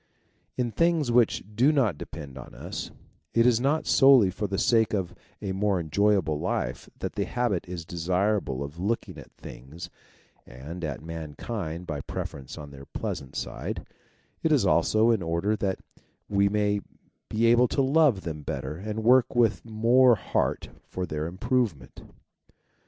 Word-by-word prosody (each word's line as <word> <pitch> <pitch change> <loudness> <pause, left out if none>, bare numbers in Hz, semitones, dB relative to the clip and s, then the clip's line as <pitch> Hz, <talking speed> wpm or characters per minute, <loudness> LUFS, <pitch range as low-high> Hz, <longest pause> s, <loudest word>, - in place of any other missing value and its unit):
In 120 -2 0
things 165 -3 +2
which 120 -1 +3
do 130 +7 +5
not 125 - +2
depend 70 -1 -9
on 65 - -10
us, - - -6 0.5
it 115 0 +5
is 120 -2 +4
not 145 +4 +1
solely 135 -8 +6
for 105 +2 -3
the 100 0 -2
sake 110 -1 +3
of 95 -4 -2 0.3
a 100 - -2
more 100 0 +1
enjoyable 85 -1 +1
life - - -3
that - - -4
the - - -1
habit 115 -8 -1
is 85 -3 -6
desirable 90 -3 0
of 75 +4 -8
looking 110 +6 -2
at - - -13
things 80 +9 -10 0.5
and 75 +8 -9
at 75 -4 -4
mankind 80 +2 -5
by 75 -4 -4
preference 70 -1 -6
on 75 -1 -9
their 70 -1 -11
pleasant 65 - -5
side; - - -4 0.6
it - - +1
is - - +4
also 110 +2 +3
in 110 -4 +1
order 85 +6 0
that 100 -2 -2 0.5
we 100 0 +2
may 105 0 +1 0.5
be 110 +2 +1
able 120 +2 +5
to 135 - +1
love 135 -6 +4
them 80 -4 -5
better 70 +1 -4
and 105 +4 -4
work 125 +2 +4
with 115 -4 +2
more 120 +3 +4
heart 90 - -1 0.2
for 90 - -4
their 75 -1 -3
improvement. 95 - -2
100 Hz, 155 wpm, -27 LUFS, 80-115 Hz, 0.6 s, solely